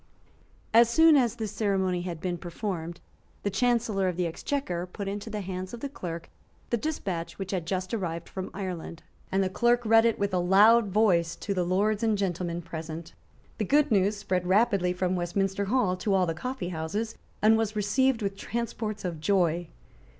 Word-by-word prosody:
As 230 0 +7
soon 320 +5 +6
as 240 -5 +3
this 220 -4 -4
ceremony 190 -4 0
had 175 -2 -5
been 175 0 -3
performed, 175 -2 -5 0.4
the 200 - 0
Chancellor 220 -3 +1
of 180 -2 -2
the 180 - +1
Exchequer 175 - -3
put 195 +2 -6
into 205 +2 -4
the 210 -1 -4
hands 185 +2 -5
of - - -11
the 280 - -4
Clerk 170 - -6 0.4
the - - +3
despatch 200 - -3
which 190 -1 -5
had 180 -4 -2
just 185 +1 -2
arrived 170 -6 -3
from 190 -1 -5
Ireland, 180 -4 -6 0.3
and 195 +1 +2
the - - +1
Clerk 240 +4 +2
read 225 +1 +6
it 230 - +2
with 200 -1 -1
a 180 - +2
loud 205 +5 +6
voice 180 -5 +2
to 200 - -3
the 180 -2 0
lords 200 +4 +1
and 220 -2 +2
gentlemen 175 -3 -2
present, 160 +1 -7 0.5
The 215 - 0
good 290 +4 +3
news 205 0 +3
spread 185 -3 -1
rapidly 195 -2 +3
from 180 0 -1
Westminster 195 +3 -1
Hall 205 -4 +1
to 195 +2 0
all 185 -1 +3
the 165 - -1
coffeehouses, 190 0 -3 0.3
and 220 +1 +6
was 220 -1 0
received 225 +4 +1
with 195 0 -2
transports 220 -1 -4
of 170 -3 -3
joy. 175 -1 +1
195 Hz, 185 wpm, -28 LUFS, 180-220 Hz, 0.5 s, As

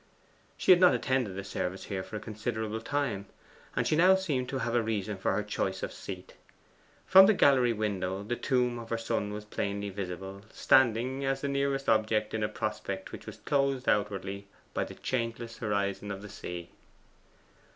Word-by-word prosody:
She - - +4
had 180 - +8
not 180 -1 +6
attended 130 -8 0
the 100 - -4
service 95 -1 -3
here 95 -2 -3
for 110 - -8
a - - -2
considerable 110 +1 -3
time, 115 -6 -2 0.5
and - - +1
she - - +2
now 185 +4 +6
seemed 145 -10 -1
to 135 - -2
have 120 -2 -2
a 120 - +3
reason 105 -2 -2
for 95 - 0
her 105 - 0
choice 95 -2 -2
of - - -3
seat. - - -8 0.7
From 190 +1 +9
the 215 - +5
gallery 130 -7 +5
window 100 -3 -2
the 115 +4 -2
tomb 125 -2 +1
of 115 -1 -9
her 115 - 0
son 105 -2 -2
was 105 0 -6
plainly 100 -1 -3
visible 95 0 -6
standing 130 +2 +3
as 135 0 0
the 140 - -1
nearest 140 0 0
object 110 0 +2
in 110 - -1
a 105 - 0
prospect 105 -3 -4
which - - -9
was - - -7
closed 140 -2 0
outwardly 100 -1 0 0.3
by - - 0
the - - -10
changeless 115 -1 -3
horizon 100 -2 -1
of 100 0 -5
the 105 - -8
sea. 85 -2 -7
110 Hz, 185 wpm, -30 LUFS, 100-130 Hz, 0.7 s, From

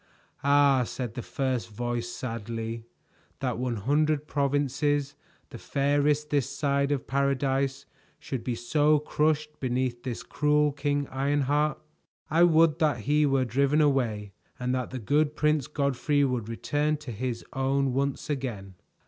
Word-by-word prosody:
"Ah," 140 -1 +5
said 120 -1 -5
the 120 - -5
first 130 -2 -2
voice 120 +2 -3
sadly, 115 -1 -5 0.5
"that 125 -3 -2
one 125 -1 -1
hundred 150 +7 +1
provinces, 145 0 0 0.4
the - - -8
fairest 145 +2 +1
this 140 -3 +1
side 140 -1 0
of 140 -3 -1
Paradise, 135 0 0 0.3
should 125 -4 -5
be 125 -1 -2
so 150 +6 +3
crushed 150 0 0
beneath 125 -1 -1
this 125 -2 -5
cruel 150 0 +2
King 145 0 -1
Ironheart! 145 +2 +1 0.5
I 165 +2 +3
would 165 -2 +5
that 150 -8 +1
he 150 +5 +2
were 135 -2 +2
driven 140 +5 +2
away, 120 -9 +1 0.3
and 125 0 -1
that 125 -2 -2
the 130 - -5
good 145 +6 +1
Prince 150 -4 +1
Godfrey 145 0 +1
would 125 -5 -1
return 145 +6 0
to 145 -4 -8
his 120 +1 -4
own 135 0 +1
once 140 +1 -1
again." 120 -9 -4
140 Hz, 140 wpm, -27 LUFS, 125-145 Hz, 0.5 s, Ah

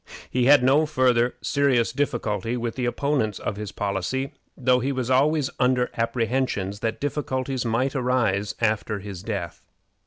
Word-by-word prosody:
He 125 -1 +1
had 140 -1 +7
no 145 +4 +4
farther 125 -4 +2
serious 135 -5 +2
difficulty 120 -5 -1
with 120 -1 -3
the 125 - -2
opponents 120 -5 0
of - - -3
his 105 -1 -6
policy, 105 +6 -2 0.2
though 125 -1 +3
he 135 +3 -1
was 130 -2 -2
always 140 +2 +3
under 125 -1 +2
apprehensions 115 -4 -1
that 110 0 -2
difficulties 130 -3 -2
might 120 +5 0
arise 120 -6 0
after 110 -1 0
his 100 -2 -7
death. 95 -6 -5
125 Hz, 150 wpm, -24 LUFS, 110-130 Hz, 0.2 s, had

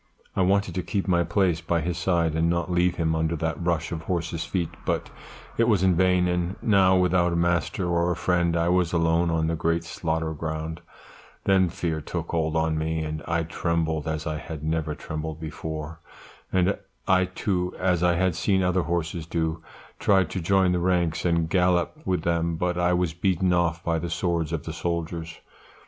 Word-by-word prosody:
"I - - +1
wanted 95 0 +2
to 90 - -1
keep 100 +2 -2
my 85 -2 +3
place 90 -3 +1
by 85 0 0
his 85 +2 -2
side 85 -2 +1
and 80 +1 +1
not 85 +1 -1
leave 90 0 +2
him 80 -1 0
under 80 +1 0
that 80 +2 -2
rush 85 -2 0
of 80 -2 -3
horses' 85 -1 -2
feet, 85 -4 -2
but - - -2 0.5
it 115 - +5
was 105 -6 +3
in 95 -1 +4
vain; 90 0 +3
and 90 +1 -1
now 95 -3 +4
without 90 -1 +2
a - - 0
master 85 +2 0
or 85 0 +1
a - - 0
friend 85 0 +1
I 85 0 +1
was 90 -1 +2
alone 85 0 +2
on 80 -1 +1
that 80 0 -1
great 85 0 +1
slaughter 80 -1 -2
ground; 80 +1 -4 0.6
then 95 -2 +3
fear 80 -1 -2
took - - -5
hold 80 -2 0
on 80 -1 +1
me, 80 0 -1
and 75 0 -4
I 85 0 +1
trembled 80 -2 -1
as 80 -1 -2
I 80 -2 -2
had 80 -2 -7
never 80 -1 -1
trembled 80 +1 -5
before; 80 0 -6 0.5
and 95 +2 +2 0.3
I 95 0 +4
too, 90 -1 -2
as 90 -2 +1
I 90 -1 +3
had 95 +1 +2
seen 95 +2 +1
other 90 0 +2
horses 85 -1 -2
do, 80 -1 -1 0.4
tried 95 -4 +3
to 95 - -3
join 95 +3 +3
in 90 - +3
the 90 - +1
ranks 85 -2 +1
and 85 -2 +2
gallop 90 - +2
with 90 -3 0
them; 85 0 0
but 90 +2 -1
I 90 0 +2
was 90 -2 0
beaten 90 +1 +1
off 85 -1 +1
by 85 -1 0
the 85 +1 -4
swords 85 -1 -1
of 80 -4 -2
the 80 - -5
soldiers. 85 -1 -3
85 Hz, 200 wpm, -25 LUFS, 80-90 Hz, 0.6 s, it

